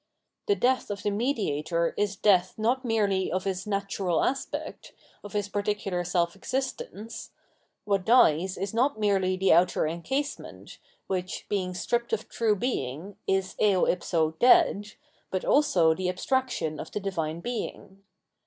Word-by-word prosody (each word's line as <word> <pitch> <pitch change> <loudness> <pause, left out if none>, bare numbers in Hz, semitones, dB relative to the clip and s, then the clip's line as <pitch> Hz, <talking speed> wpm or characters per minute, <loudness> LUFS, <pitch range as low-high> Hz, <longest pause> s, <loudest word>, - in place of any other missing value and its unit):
The 410 - +3
death 255 - +1
of 205 -1 -5
the 205 - +1
mediator 170 - 0
is 205 -1 0
death 185 -3 +3
not 240 +5 +1
merely 205 -5 +1
of 185 +1 -1
his 190 0 -3
natural 195 -3 0
aspect, 270 +1 -3 0.3
of 205 - -9
his 205 -1 -1
particular 200 -2 -2
self 175 0 0
existence: 230 -1 -5 0.6
what 200 -2 +1
dies 185 -6 +4
is 195 +2 -3
not 245 +1 +1
merely 190 -3 +1
the 190 0 +4
outer 175 +1 +3
encasement, 265 - -4 0.3
which, 185 -2 -3
being 185 -3 -1
stripped 235 +5 -1
of 220 0 -1
true 220 -2 +1
Being, 185 - -3
is 190 -1 0
eo 200 -4 +4
ipso 165 -3 +1
dead, 250 - +4 0.4
but 185 - -2
also 185 - +4
the 185 +2 -2
abstraction 185 - -1
of - - -6
the - - -3
Divine 170 -5 -3
Being. 195 -3 -6
195 Hz, 145 wpm, -27 LUFS, 180-225 Hz, 0.6 s, dies